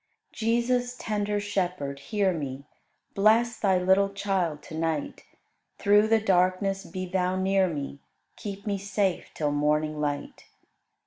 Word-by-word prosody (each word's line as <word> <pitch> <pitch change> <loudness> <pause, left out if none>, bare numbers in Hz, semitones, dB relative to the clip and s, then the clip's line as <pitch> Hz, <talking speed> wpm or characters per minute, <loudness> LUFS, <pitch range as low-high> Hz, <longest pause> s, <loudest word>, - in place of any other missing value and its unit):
28. - - -11 0.2
Jesus, 245 +1 0
tender 210 -2 -1
Shepherd, 180 -9 -2
hear 195 +5 0
me: 140 -3 -5 0.5
Bless 225 +3 +3
Thy 190 -3 +3
little 190 +2 +3
child 190 -6 -1
to - - -11
night; 160 -2 -2 0.6
Through 205 +1 +4
the 225 0 +4
darkness 195 0 +1
be 185 -1 -5
Thou 185 0 0
near 190 0 +2
me, 140 -4 -5 0.4
Keep 200 0 -7
me 200 -2 -1
safe 195 -1 -1
till 150 -2 0
morning 150 +1 +1
light. 145 -1 -3
190 Hz, 135 wpm, -27 LUFS, 160-205 Hz, 0.6 s, Through